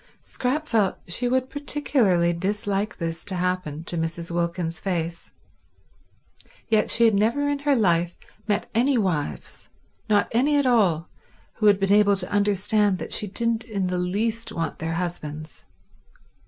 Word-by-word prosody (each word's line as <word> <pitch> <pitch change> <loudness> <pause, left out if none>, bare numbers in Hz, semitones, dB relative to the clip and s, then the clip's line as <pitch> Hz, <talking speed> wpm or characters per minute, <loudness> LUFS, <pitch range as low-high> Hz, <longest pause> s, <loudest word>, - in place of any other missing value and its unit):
Scrap 295 +5 -2
felt 215 -7 +1
she 235 +8 0
would 255 +1 +1
particularly 250 -12 +1
dislike 200 +3 -2
this 165 -1 -4
to 200 -2 -3
happen 180 -4 -2
to 170 0 -4
Mrs. 165 +1 -3
Wilkins's 170 -1 -2
face, 170 -3 -3 1.4
yet 220 -2 +2
she 235 - +4
had 225 - +5
never 230 +8 +2
in 285 0 0
her 285 0 +2
life 175 -6 +2 0.3
met 205 0 0
any 250 +4 +3
wives, 155 - -3 0.4
not 205 -1 +3
any 280 +6 +3
at 285 - +2
all, 190 -10 +3 0.5
who 215 - +2
had 200 -1 +5
been 195 0 +2
able 205 -1 +5
to 185 -2 -5
understand 205 0 +2
that - - -6
she 210 - -1
didn't 230 +3 -1
in 200 -5 -2
the 180 0 -1
least 220 +6 -1
want 165 -1 -3
their 165 0 -2
husbands. 155 -3 -5
200 Hz, 155 wpm, -24 LUFS, 170-230 Hz, 1.4 s, had